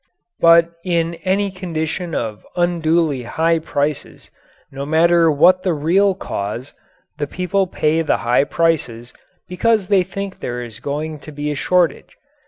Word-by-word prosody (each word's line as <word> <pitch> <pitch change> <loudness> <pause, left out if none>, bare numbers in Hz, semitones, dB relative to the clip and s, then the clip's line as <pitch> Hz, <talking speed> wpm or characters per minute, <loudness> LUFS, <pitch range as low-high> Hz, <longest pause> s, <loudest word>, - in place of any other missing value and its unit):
But 170 0 +5
in 170 -2 0
any 195 +1 +1
condition 170 -2 -4
of 105 -4 -4
unduly 165 -5 +1
high 165 +7 0
prices, 145 -1 -3 0.4
no 135 0 -6
matter 165 +2 +3
what 180 +5 +4
the 180 -3 0
real 185 +6 +2
cause, 115 - -5 0.5
the 145 - -1
people 185 +4 -1
pay 160 -1 0
the 160 - +1
high 125 +4 +3
prices 130 -9 -1 0.3
because 205 +2 +1
they 200 -2 +4
think 190 +2 -6
there 125 0 -4
is 115 -3 -10
going 150 +2 -4
to 155 - -11
be 150 0 -3
a - - -3
shortage. 180 +4 0
165 Hz, 145 wpm, -19 LUFS, 145-180 Hz, 0.5 s, But